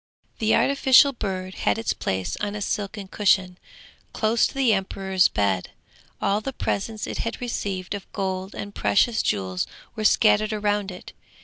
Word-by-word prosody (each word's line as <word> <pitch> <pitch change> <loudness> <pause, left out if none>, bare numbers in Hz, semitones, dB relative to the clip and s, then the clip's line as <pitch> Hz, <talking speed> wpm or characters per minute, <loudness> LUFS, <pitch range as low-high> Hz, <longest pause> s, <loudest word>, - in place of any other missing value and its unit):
The 220 0 +3
artificial 275 0 +5
bird 185 -5 -4
had 105 - 0
its 115 - -1
place 95 -1 -2
on 205 0 -3
a 210 - -5
silken 200 -1 -3
cushion, 190 -2 +1 0.5
close 220 +1 +2
to - - -11
the 260 -5 +3
emperor's 190 -1 +1
bed: 95 -3 0 0.5
all 205 +2 +1
the 270 - -4
presents 215 -1 -2
it - - -5
had 230 - -3
received 200 -6 -3
of 200 -2 -7
gold 190 -1 -3
and 205 0 -6
precious 220 +3 +2
jewels 95 -3 -1 0.3
were 215 - -4
scattered 215 -1 +4
round 205 -1 0
it. 180 -1 -10
200 Hz, 155 wpm, -24 LUFS, 185-215 Hz, 0.5 s, artificial